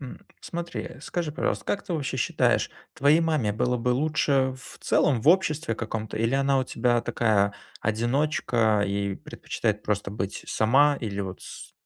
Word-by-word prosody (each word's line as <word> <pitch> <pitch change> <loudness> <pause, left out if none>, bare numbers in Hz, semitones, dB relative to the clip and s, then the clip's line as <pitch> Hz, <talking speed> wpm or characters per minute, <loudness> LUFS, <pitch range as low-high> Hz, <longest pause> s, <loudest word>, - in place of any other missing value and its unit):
М. 130 -3 -10
Смотри, 170 0 -6
скажи, 165 -4 -3
пожалуйста, - - -2
как 200 - -1
ты 180 - -5
вообще 140 -3 -2
считаешь, - - +1 0.2
твоей 145 +4 +4
маме 155 -10 +1
было 125 +4 0
бы 125 +2 0
лучше 135 -1 +1
в - - -13
целом 125 -7 +2
в - - +2
обществе 160 -8 +3
каком-то 110 -1 -4
или 115 +4 +1
она 135 0 +2
у 130 - +1
тебя 120 -2 +1
такая, 100 -4 +1 0.3
одиночка 115 -2 +1
и 100 0 -1
предпочитает 105 +2 -3
просто 105 -1 -2
быть 100 -1 -4
сама 140 +6 +3
или 100 -3 -3
вот 95 -1 -5
с - - -10
125 Hz, 160 wpm, -26 LUFS, 110-145 Hz, 0.3 s, твоей